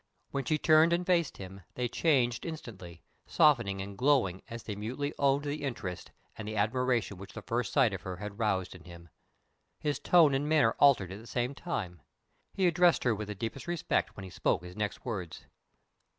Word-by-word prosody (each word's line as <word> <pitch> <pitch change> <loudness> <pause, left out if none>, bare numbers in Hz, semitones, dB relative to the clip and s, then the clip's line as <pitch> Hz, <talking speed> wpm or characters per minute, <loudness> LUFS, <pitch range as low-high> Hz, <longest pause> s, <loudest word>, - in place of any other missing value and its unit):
When 140 -1 -2
she 155 - +1
turned 155 +2 +5
and 175 +1 0
faced 170 -4 +1
him, 95 0 -9
they 125 -1 -1
changed 125 -4 +1
instantly, 100 - -8 0.2
softening 120 -10 +3
and 100 0 -8
glowing 120 -7 +2
as 115 0 -7
they 105 - -5
mutely 130 +8 -4
owned 140 0 +3
the 145 +1 -3
interest 110 -10 -5 0.3
and 110 - -7
the 110 - -4
admiration 115 0 0
which 100 +1 -10
the - - -8
first 115 -2 -2
sight 125 -7 +3
of 95 - -5
her 95 -1 -5
had 105 +2 -7
roused 95 -5 0
in 90 -2 -14
him. 85 -1 -12 0.7
His 150 -1 -1
tone 165 -5 +5
and 140 +2 0
manner 150 -8 +4
altered 125 -11 +5
at 100 - -7
the 115 - -13
same 125 +3 -1
time. 100 - -5 0.5
He 190 - +1
addressed 175 0 +4
her 120 - +3
with 105 -1 -5
the 105 - -5
deepest 115 - -5
respect 175 -2 -1
when 95 - -7
he 95 - -9
spoke 85 - 0
his 90 0 -10
next 105 +3 -4
words. 95 -9 -5
115 Hz, 195 wpm, -30 LUFS, 100-145 Hz, 0.7 s, turned